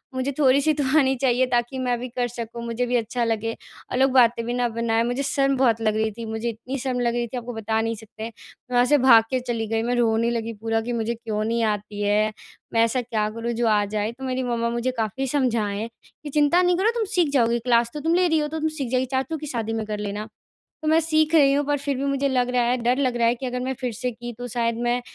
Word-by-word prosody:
मुझे 260 Hz, +2 st, -1 dB
थोड़ी-सी 280 Hz, +2 st, +4 dB
तो 295 Hz, -1 st, -1 dB, 0.2 s
आनी 265 Hz, -1 st, +2 dB
चाहिए 255 Hz, -1 st, +2 dB
ताकि 245 Hz, +2 st, -1 dB
मैं 250 Hz, -1 st, 0 dB
भी 250 Hz, -, -5 dB
कर 245 Hz, 0 st, -1 dB
सकूँ 235 Hz, 0 st, -7 dB
मुझे 235 Hz, +1 st, -1 dB
भी 245 Hz, 0 st, -1 dB
अच्छा 235 Hz, +1 st, -1 dB
लगे। 225 Hz, 0 st, -1 dB, 0.4 s
और -, -, -1 dB
लोग 265 Hz, +1 st, +4 dB
बातें 235 Hz, -2 st, +4 dB
भी 240 Hz, -, -2 dB
ना 245 Hz, 0 st, +1 dB
बनाएँ 230 Hz, 0 st, 0 dB
मुझे 245 Hz, +4 st, -1 dB
शर्म 275 Hz, 0 st, +1 dB
बहुत 230 Hz, -4 st, +2 dB
लग 215 Hz, -1 st, +1 dB
रही 220 Hz, 0 st, 0 dB
थी 230 Hz, +2 st, -8 dB
मुझे 220 Hz, +1 st, -3 dB
इतनी 240 Hz, +4 st, -5 dB
शर्म 250 Hz, -1 st, -2 dB
लग 235 Hz, -1 st, +1 dB
रही 240 Hz, 0 st, -1 dB
थी 250 Hz, +2 st, -6 dB
आपको 245 Hz, 0 st, -5 dB
बता 220 Hz, 0 st, -1 dB
नहीं 225 Hz, 0 st, -1 dB
सकते। 220 Hz, 0 st, -11 dB
मैं 230 Hz, +2 st, -14 dB
वहाँ 245 Hz, 0 st, +5 dB
से 295 Hz, +3 st, +4 dB
भाग 245 Hz, -4 st, +7 dB
के 260 Hz, -, 0 dB
चली 235 Hz, -3 st, -3 dB
गई 225 Hz, +1 st, -1 dB
मैं 245 Hz, +1 st, 0 dB
रोने 230 Hz, -1 st, +2 dB
लगी 230 Hz, -1 st, -3 dB
पूरा 225 Hz, 0 st, 0 dB
कि 240 Hz, +2 st, -4 dB
मुझे 230 Hz, 0 st, -1 dB
क्यों 220 Hz, -2 st, -3 dB
नहीं 230 Hz, +1 st, 0 dB
आती 210 Hz, -1 st, -2 dB
है। 210 Hz, +1 st, +2 dB, 0.4 s
मैं 230 Hz, -, +4 dB
ऐसा 230 Hz, +3 st, +1 dB
क्या 220 Hz, -3 st, -1 dB
करूँ 230 Hz, +2 st, -4 dB
जो 235 Hz, 0 st, 0 dB
आ 210 Hz, -1 st, +3 dB
जाए। 210 Hz, +1 st, -2 dB
तो 255 Hz, +3 st, -12 dB
मेरी 260 Hz, 0 st, -2 dB
मम्मा 235 Hz, -1 st, -1 dB
मुझे 235 Hz, +2 st, -1 dB
काफ़ी 225 Hz, +4 st, -2 dB
समझाएँ 230 Hz, -6 st, 0 dB, 0.4 s
कि 295 Hz, -, -6 dB
चिंता 295 Hz, +4 st, +3 dB
नहीं 360 Hz, -1 st, +3 dB
करो 400 Hz, +4 st, +3 dB
तुम 455 Hz, -2 st, 0 dB
सीख 345 Hz, -4 st, +3 dB
जाओगी 235 Hz, -3 st, +3 dB
क्लास 235 Hz, 0 st, +2 dB
तो 300 Hz, -, -4 dB
तुम 325 Hz, +3 st, 0 dB
ले 360 Hz, 0 st, +3 dB
रही 320 Hz, -2 st, +2 dB
हो 300 Hz, -, 0 dB
तो 320 Hz, +1 st, -4 dB
तुम 315 Hz, 0 st, 0 dB
सीख 290 Hz, -5 st, -4 dB
जाओगी। 255 Hz, 0 st, +2 dB
चाचू 270 Hz, +5 st, -1 dB
की 300 Hz, -, -7 dB
शादी 225 Hz, -5 st, -3 dB
में 225 Hz, -1 st, -2 dB
कर 210 Hz, 0 st, -4 dB
लेना। 210 Hz, +1 st, -4 dB, 0.6 s
तो 310 Hz, -, -1 dB
मैं 320 Hz, +1 st, +5 dB
सीख 315 Hz, 0 st, +1 dB
रही 280 Hz, -4 st, +6 dB
हूँ 285 Hz, +1 st, +1 dB
पर 290 Hz, 0 st, +1 dB
फ़िर 280 Hz, 0 st, -2 dB
भी 270 Hz, -, -2 dB
मुझे 275 Hz, 0 st, 0 dB
लग 250 Hz, -2 st, +1 dB
रहा 250 Hz, -1 st, +2 dB
है 245 Hz, +1 st, +2 dB
डर 245 Hz, +2 st, +2 dB
लग 255 Hz, -3 st, +1 dB
रहा 235 Hz, -1 st, +2 dB
है 235 Hz, -, +3 dB
कि 255 Hz, +2 st, -6 dB
अगर 250 Hz, 0 st, -3 dB
मैं 265 Hz, +1 st, -2 dB
फ़िर 250 Hz, -2 st, -2 dB
से 250 Hz, +3 st, -3 dB
की 240 Hz, +1 st, -7 dB
तो 245 Hz, -, -5 dB
शायद 235 Hz, -1 st, -1 dB
मैं 240 Hz, +1 st, +1 dB
240 Hz, 270 wpm, -24 LUFS, 225-265 Hz, 0.6 s, भाग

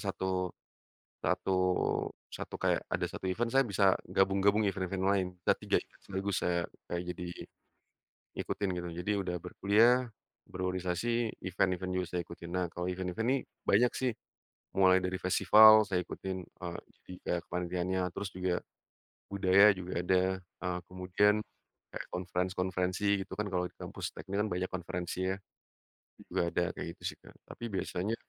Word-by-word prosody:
satu 95 Hz, -1 st, -1 dB, 0.8 s
satu -, -, 0 dB, 0.8 s
satu -, -, -7 dB
kayak -, -, +1 dB
ada -, -, +1 dB
1 -, -, -6 dB
event 115 Hz, +6 st, 0 dB
saya 135 Hz, +2 st, +4 dB
bisa 100 Hz, -2 st, +4 dB
gabung-gabung 95 Hz, +3 st, +3 dB
event-event 95 Hz, -1 st, -2 dB
lain, 95 Hz, -1 st, +3 dB, 0.2 s
nah -, -, +3 dB
3 -, -, +1 dB
event -, -, -26 dB
sekaligus 100 Hz, 0 st, -2 dB
saya 85 Hz, -1 st, +1 dB, 0.2 s
kayak 85 Hz, 0 st, -2 dB
jadi, 90 Hz, 0 st, -5 dB, 1.1 s
ngikutin 100 Hz, -, -1 dB
gitu. 85 Hz, -, -4 dB
Jadi 100 Hz, -, -2 dB
udah 90 Hz, -2 st, -2 dB
berkuliah, 115 Hz, +6 st, +4 dB, 0.4 s
berorganisasi 95 Hz, +6 st, -1 dB
event-event 95 Hz, 0 st, 0 dB
juga 90 Hz, -1 st, 0 dB
saya 90 Hz, -, 0 dB
ikutin. 85 Hz, 0 st, -10 dB
Nah 90 Hz, 0 st, +1 dB
kalau 90 Hz, +1 st, -4 dB
event-event 90 Hz, +4 st, -3 dB
nih 135 Hz, +1 st, +3 dB, 0.3 s
banyak 120 Hz, +5 st, +4 dB
sih, 130 Hz, -2 st, +1 dB, 0.7 s
mulai 95 Hz, -1 st, +6 dB
dari 90 Hz, 0 st, -2 dB
festival 110 Hz, +3 st, +8 dB
saya 95 Hz, -3 st, 0 dB
ikutin, 95 Hz, -1 st, -4 dB
eee, 85 Hz, -2 st, -7 dB, 0.2 s
jadi -, -, -13 dB
kayak 85 Hz, -, +1 dB
kepanitiannya 90 Hz, +1 st, -1 dB, 0.2 s
terus 100 Hz, -, -2 dB
juga, 90 Hz, -1 st, -1 dB, 0.8 s
budaya 100 Hz, 0 st, +6 dB
juga 90 Hz, 0 st, -5 dB
ada, 90 Hz, 0 st, +4 dB, 0.2 s
eee, 90 Hz, 0 st, -4 dB
kemudian, 95 Hz, +3 st, +2 dB, 0.5 s
kayak -, -, -6 dB
conference 90 Hz, 0 st, -1 dB
konferensi 90 Hz, +1 st, -1 dB, 0.2 s
gitu, -, -, -10 dB
kan, 105 Hz, -, 0 dB
kalau 90 Hz, -1 st, 0 dB
di -, -, -31 dB
kampus -, -, -5 dB
teknik, 100 Hz, +1 st, -5 dB
kan, 105 Hz, -, +1 dB
banyak 90 Hz, +1 st, -1 dB
konferensinya. 90 Hz, +1 st, -2 dB, 1.0 s
Juga 85 Hz, -, +1 dB
ada 85 Hz, +1 st, +1 dB
kayak -, -, -5 dB
gitu, -, -, -20 dB
sih, -, -, -22 dB
Kak, -, -, -16 dB
tapi 120 Hz, -, -8 dB
biasanya. 95 Hz, +3 st, -1 dB
95 Hz, 150 wpm, -32 LUFS, 90-100 Hz, 1.1 s, festival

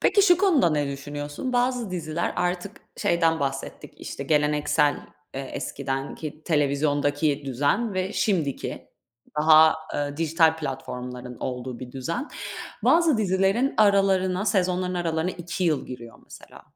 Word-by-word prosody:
Peki 405 Hz, +1 st, +4 dB
şu 355 Hz, -3 st, +6 dB
konuda 345 Hz, -, +4 dB
ne 150 Hz, -2 st, 0 dB
düşünüyorsun? 145 Hz, -, -5 dB
Bazı 245 Hz, -4 st, 0 dB
diziler, 165 Hz, -1 st, -2 dB
artık 180 Hz, +3 st, -2 dB, 0.2 s
şeyden 165 Hz, -2 st, +2 dB
bahsettik 135 Hz, -1 st, -4 dB
işte 140 Hz, -, -6 dB
geleneksel, 150 Hz, 0 st, +2 dB, 0.4 s
eee, 135 Hz, -, -3 dB
eskiden 135 Hz, 0 st, -4 dB
ki 155 Hz, 0 st, -8 dB
televizyondaki 145 Hz, 0 st, +1 dB
düzen 145 Hz, -, 0 dB
ve 185 Hz, +1 st, -1 dB
şimdiki 165 Hz, -10 st, -1 dB, 0.5 s
daha, 155 Hz, 0 st, +7 dB, 0.2 s
eee, 145 Hz, 0 st, -2 dB
dijital 160 Hz, 0 st, +3 dB
platformların 125 Hz, -4 st, -6 dB
olduğu 125 Hz, -1 st, -4 dB
bir 125 Hz, -1 st, -9 dB
düzen. 165 Hz, -, -4 dB, 0.6 s
Bazı 320 Hz, -7 st, +4 dB
dizilerin 195 Hz, +6 st, +1 dB
aralarına 195 Hz, -2 st, +3 dB
sezonların 185 Hz, -1 st, +1 dB
aralarına 170 Hz, 0 st, -1 dB
2 175 Hz, +1 st, -4 dB
yıl 155 Hz, -4 st, +1 dB
giriyor 120 Hz, -2 st, -9 dB
mesela. -, -, -14 dB
160 Hz, 125 wpm, -25 LUFS, 145-190 Hz, 0.6 s, daha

